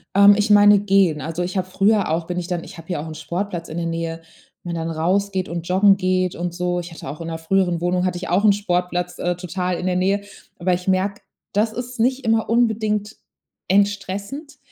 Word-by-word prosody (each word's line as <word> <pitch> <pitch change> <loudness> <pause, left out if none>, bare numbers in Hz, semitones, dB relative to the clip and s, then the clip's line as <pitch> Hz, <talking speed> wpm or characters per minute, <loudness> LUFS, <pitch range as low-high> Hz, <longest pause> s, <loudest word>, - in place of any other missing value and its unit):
Ähm, 200 +1 +8
ich 210 +1 0
meine 205 0 +7
gehen. 195 -6 +3
Also, 165 +3 -3
ich 180 +2 -4
habe 185 - 0
früher 200 0 +2
auch 165 +1 -1
bin 180 +1 -3
ich 175 - -3
dann 175 -2 -3
ich - - -11
habe 165 - -12
hier 175 -5 -2
auch 155 - -6
'n 155 - -7
Sportplatz 170 +3 -4
in 160 - -5
der 170 - -2
Nähe, 165 0 -3 0.4
wenn 175 -1 -4
dann 165 0 -3
raus 185 +5 0
geht 185 -1 -2
und 170 0 -5
joggen 195 +2 +5
geht 185 -1 0
und 175 0 -4
so. 180 0 -1
Ich 175 0 -9
hatte 160 - -9
auch 145 +4 -7
in 165 - -5
'ner 165 -1 -4
früheren 175 +1 +1
Wohnung 180 +1 0
hatte 180 -1 -1
ich 180 - -6
auch 185 +4 +2
'n 210 - +7
Sportplatz, 180 -3 -2
äh, 175 0 -1
total 180 0 -3
in 180 - -4
der 180 -1 +1
Nähe. 195 +2 +1 0.4
Aber 180 +1 +1
ich 180 +1 -5
merke, 190 +2 0 0.3
das 215 +2 +1
ist 245 +2 -6
nicht 255 +3 +1
immer 225 -1 +1
unbedingt 220 -2 +1 0.5
entstressend, 200 - -1
185 Hz, 230 wpm, -21 LUFS, 175-205 Hz, 0.5 s, Ähm